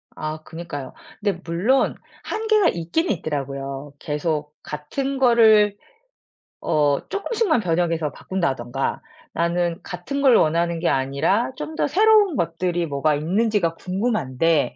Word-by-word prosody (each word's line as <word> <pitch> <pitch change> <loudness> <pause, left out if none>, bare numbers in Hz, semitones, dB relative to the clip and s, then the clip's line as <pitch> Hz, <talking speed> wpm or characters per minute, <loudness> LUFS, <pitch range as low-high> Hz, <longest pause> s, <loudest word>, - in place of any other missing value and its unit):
아. 155 0 -4
그니까요. 160 -5 -7 0.3
근데 200 -4 -1
물론 190 +11 +1 0.3
한계가 435 -4 +2
있긴 175 - -1
있더라고요. 140 -4 -4
계속 150 -1 -2
같은 265 - -4
거를 220 -5 +5 0.8
어 145 -2 +2
쪼끔씩만 400 - 0
변형해서 165 -4 0
바꾼다든가 135 -8 -2 0.3
나는 170 +1 0
같은 195 +10 -4
걸 260 -4 +6
원하는 170 +1 +2
게 170 - +1
아니라 140 - +1
좀 315 - -6
더 - - +1
새로운 410 +1 +4
것들이 170 +1 -1
뭐가 145 +1 +1
있는지가 180 +2 +1
궁금한데 165 - 0
170 Hz, 280 characters per minute, -22 LUFS, 150-225 Hz, 0.8 s, 걸